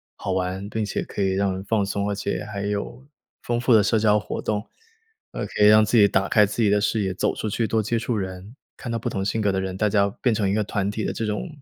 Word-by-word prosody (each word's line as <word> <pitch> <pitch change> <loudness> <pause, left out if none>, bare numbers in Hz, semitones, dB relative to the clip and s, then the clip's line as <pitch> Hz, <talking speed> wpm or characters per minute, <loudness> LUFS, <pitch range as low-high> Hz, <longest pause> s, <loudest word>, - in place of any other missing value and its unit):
好 95 - -4
玩， 95 +2 -2
并 110 0 -2
且 100 - -3
可 100 - -3
以 95 - +1
让 95 0 0
人 95 +1 -5
放 105 +1 +1
松， 100 +1 -2
而 105 - -1
且 100 +1 -3
还 100 -2 -5
有 105 +5 -4 0.4
丰 120 0 -1
富 120 0 +3
的 110 - +7
社 110 +3 +2
交 105 -1 +3
活 105 - -5
动。 105 0 -2 0.6
呃， - - -4
可 - - -5
以 105 - +8
让 110 0 +7
自 110 +3 +2
己 105 -2 +7
打 95 -1 0
开 105 -1 +5
自 105 +3 -2
己 105 - +4
的 105 +1 +3
视 105 +2 0
野， 95 -1 -1
走 95 - -1
出 110 - -3
去 110 +2 -1
多 110 -1 0
接 115 +2 0
触 120 - -2
人 95 +3 -6 0.2
看 120 - -7
到 115 - -1
不 115 - -3
同 95 -2 -3
性 105 +3 -1
格 105 -1 +2
的 95 - -1
人， 95 -1 -3
大 105 +2 +1
家 100 -1 +2
变 125 - +2
成 105 -3 0
一 - - +1
个 105 +1 +1
团 100 -1 -2
体 110 +1 -3
的 - - -1
这 115 - -3
种 105 +9 -3
105 Hz, 310 characters per minute, -23 LUFS, 100-110 Hz, 0.6 s, 以